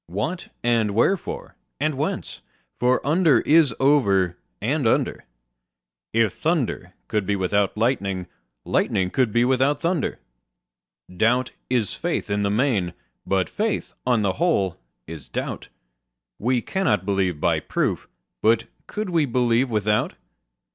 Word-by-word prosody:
What, 105 - -3 0.2
and 115 -4 +2
wherefore, 185 - 0 0.2
and 155 +2 +1
whence? 140 +3 -3 0.4
for 125 +1 +2
under 160 -1 +4
is 155 -3 +5
over 100 - +3 0.2
and 135 +4 0
under: - - 0 0.9
If 115 -3 +2
thunder 135 - -1
could 105 -3 -1
be 100 - +1
without 100 +2 0
lightning, 100 -6 0 0.4
lightning 95 -1 +1
could 130 -5 +1
be 120 +3 +3
without 130 +3 +2
thunder. 170 -3 0 1.0
Doubt 125 +6 +2 0.2
is 120 -6 0
faith - - -2
in 100 0 +1
the 100 - +1
main: 105 -6 +1 0.3
but 95 -1 +1
faith, 215 0 -2
on 120 -4 +2
the 95 -2 +1
whole, 100 - +1 0.3
is 80 -3 -9
doubt: - - -4 0.7
We 120 +2 +1
cannot 190 - 0
believe 95 -5 0
by - - +2
proof: - - -2 0.3
but 115 +1 +3 0.2
could 210 -3 -4
we 165 -3 +3
believe 125 +1 +2
without? 105 -1 +1
115 Hz, 130 wpm, -23 LUFS, 100-140 Hz, 1.0 s, is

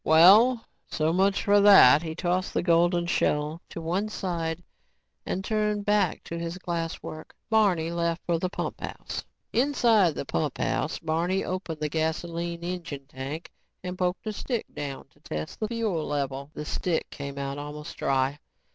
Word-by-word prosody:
"Well, 210 +10 +7 0.2
so 155 +1 0
much 195 +2 +2
for 205 0 +5
that." 175 -9 +8
He 160 -1 -5
tossed 180 +1 -1
the - - +1
golden 175 0 +3
shell 150 -1 0
to - - -7
one 180 +6 -1
side 170 -4 -3 0.6
and 190 +1 -2
turned 210 -1 0
back 210 0 +2
to 170 - -5
his 170 +1 -4
glass 170 -3 -3
work. 155 0 -8 0.2
Barney 185 -7 +3
left 170 0 -1
for 170 -1 +1
the 185 - -1
pumphouse. - - -5 0.3
Inside 230 - +3
the - - -4
pumphouse, 80 - -1
Barney 170 +4 0
opened 180 -4 -4
the 150 - +1
gasoline 170 +2 -2
engine 170 -6 -5
tank 140 +4 -7 0.3
and 180 0 -4
poked 180 +2 -1
a 215 - -2
stick 235 +2 -3
down 140 -2 -5
to 145 - -28
test 80 - -6
the 215 - -1
fuel 215 -8 -1
level. 140 -1 -2
The 150 - -5
stick 170 +2 -2
came 140 -1 -6
out 140 0 -3
almost 150 +1 -7
dry. 135 +1 0
170 Hz, 160 wpm, -27 LUFS, 155-190 Hz, 0.6 s, that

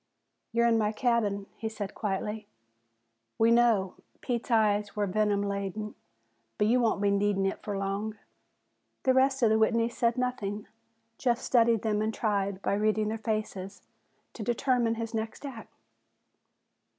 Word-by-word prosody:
"You're 235 +1 +2
in 230 -1 +4
my 210 -1 +1
cabin," 215 -4 0
he 220 - -3
said 210 -3 -6
quietly. 210 +1 -3 0.9
"We 225 +1 +4
knaow," 230 -6 +3 0.3
Pete's 240 0 -3
eyes 210 -3 +2
were 210 -1 +1
venom 205 +1 +1
laden, 200 +1 -3 0.6
"but 210 - +2
you 240 +4 +3
won't 225 -4 +1
be 200 - +3
needin' 200 -1 +1
it 195 - -2
fer 205 -2 -4
long." 200 +2 -3 0.9
The 260 - +4
rest 265 0 +3
of 220 - +5
the 220 - +4
Whitneys 230 +1 +2
said 235 0 +1
nothing. 215 -5 -2 0.5
Jeff 240 -3 +2
studied 235 -3 +3
them 210 -2 +1
and 215 +1 0
tried, 200 -3 -1
by - - +1
reading 215 +1 +1
their 220 +1 -3
faces, 215 -3 -4 0.5
to - - -8
determine 240 0 +1
his 230 0 -5
next 225 +5 -4
act. 245 -5 -8
215 Hz, 150 wpm, -29 LUFS, 205-230 Hz, 0.9 s, of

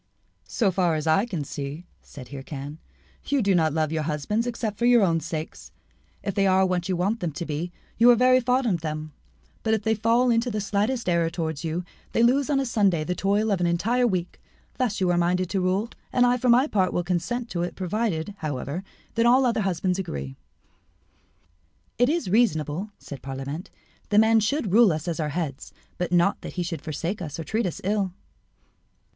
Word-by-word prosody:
"So 210 -6 +1
far 175 -3 +1
as 155 0 -3
I 165 +8 +3
can 175 -10 -3
see," 140 +4 -6 0.2
said 130 -4 -12
Hircan, 140 +2 -7 0.5
"you 285 - +1
do 200 -1 +3
not 160 -3 +3
love 155 0 0
your 160 -1 -1
husbands 160 +10 -1
except 225 -3 -3
for 240 - +3
your 240 -3 +6
own 165 -3 +2
sakes. 160 0 -6 0.5
If 200 - -2
they 195 +1 +2
are 190 0 +4
what 180 -1 -1
you 185 - +1
want 200 +6 0
them 175 -5 -2
to 170 - -4
be, 160 +3 -3 0.3
you 235 +1 +7
are 245 - +8
very 255 +2 +5
fond 255 +1 +1
of 180 -8 0
them; 155 -1 -5 0.5
but 220 0 +2
if 220 - -4
they 220 - +2
fall 230 +3 +2
into 230 +1 +1
the 215 -2 -2
slightest 210 +4 -1
error 170 -2 +2
towards 160 -3 -4
you, 165 +2 -2 0.3
they 230 - +3
lose 270 +4 +3
on 280 -2 +2
a 270 - 0
Saturday 200 -9 +2
the 180 - -2
toil 205 +4 +1
of 190 -3 +1
an 175 - +2
entire 230 +9 +2
week. 180 -4 -3 0.4
Thus 235 -5 0
you 185 -2 +2
are 175 - +2
minded 180 +1 +1
to 195 - 0
rule, 190 +5 0 0.2
and 245 -1 +4
I 245 0 +4
for 250 0 0
my 245 +3 +6
part 190 -10 +1
will 175 - 0
consent 185 +8 -2
to 170 - -2
it 175 - -3
provided, 195 -1 -2
however, 150 +3 -4 0.3
that 230 +1 +3
all 255 +2 +5
other 230 -3 +1
husbands 185 -1 0
agree." 70 - -5 1.6
"It 245 +2 +4
is 335 - 0
reasonable," 180 - +1
said 140 - -9
Parlamente, 135 +5 -6 0.4
"that 210 - +5
man 220 +1 +5
should 225 - 0
rule 225 -3 +6
us 155 +1 -3
as 170 -1 -2
our 155 -1 -1
head, 145 -3 -3 0.4
but 180 -1 -2
not 175 +3 +3
that - - -7
he 180 - -2
should 170 -1 -4
forsake 165 +6 -4
us 155 -2 -5
or - - -3
treat 220 +6 -1
us 170 - -5
ill." 195 -2 0
185 Hz, 210 wpm, -25 LUFS, 160-225 Hz, 1.6 s, are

